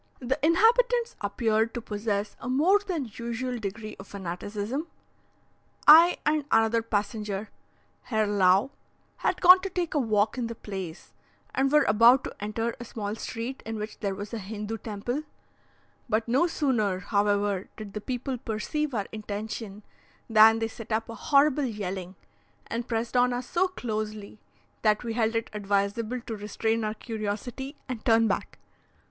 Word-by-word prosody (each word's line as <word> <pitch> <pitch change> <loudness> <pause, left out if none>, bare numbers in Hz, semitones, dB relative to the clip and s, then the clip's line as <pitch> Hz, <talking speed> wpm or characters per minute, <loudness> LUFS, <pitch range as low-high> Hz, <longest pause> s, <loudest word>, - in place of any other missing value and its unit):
The 265 +3 -2
inhabitants 470 +8 +3
appeared 220 +2 0
to - - -1
possess 210 -2 -3
a 245 - -6
more 325 +10 +4
than 335 - -4
usual 240 +1 -3
degree 215 +1 -6
of 195 - -10
fanaticism. 205 - -4 1.0
I 330 +4 +9
and 300 0 +2
another 225 +1 +4
passenger, 210 -1 -3 0.5
Herr 220 -2 +1
Lau, 200 +3 +3 0.5
had 365 - 0
gone 365 +1 +9
to 390 - -3
take 355 -3 -2
a 300 - +2
walk 215 -1 +1
in 235 - -1
the 230 - -6
place, 190 -6 -7 0.4
and 270 +1 +1
were 300 0 +5
about 230 +5 +6
to - - -6
enter 225 +3 -2
a - - -6
small 210 -3 -5
street 230 +3 -5
in 225 - -5
which 210 0 -6
there 200 -2 -2
was 205 +3 -7
a 230 - -2
Hindoo 210 +2 -5
temple; 225 +7 -3 0.9
but 220 +1 +1
no 265 +9 +3
sooner, 220 - 0
however, 205 0 0
did 210 -2 -8
the 210 - -4
people 255 +1 -3
perceive 250 +6 -2
our 205 -2 -1
intention, 215 -1 -6 0.4
than 225 0 +7
they 225 0 -1
set 225 0 -10
up 220 +1 -1
a - - -5 0.2
horrible 290 0 +5
yelling, 190 -5 -4 0.5
and 235 +1 -4
pressed 230 +1 -2
on 250 0 +4
us 245 0 -4
so 365 +2 +2
closely, 215 - -5 0.4
that 215 0 +2
we 230 -2 -3
held 225 -1 +1
it 225 - -2
advisable 205 +4 -1
to 230 -1 -6
restrain 220 +2 -1
our 215 0 -2
curiosity 225 +5 -5
and 250 -5 -5
turn 225 -3 +4
back. - - -2
225 Hz, 160 wpm, -27 LUFS, 210-255 Hz, 1.0 s, I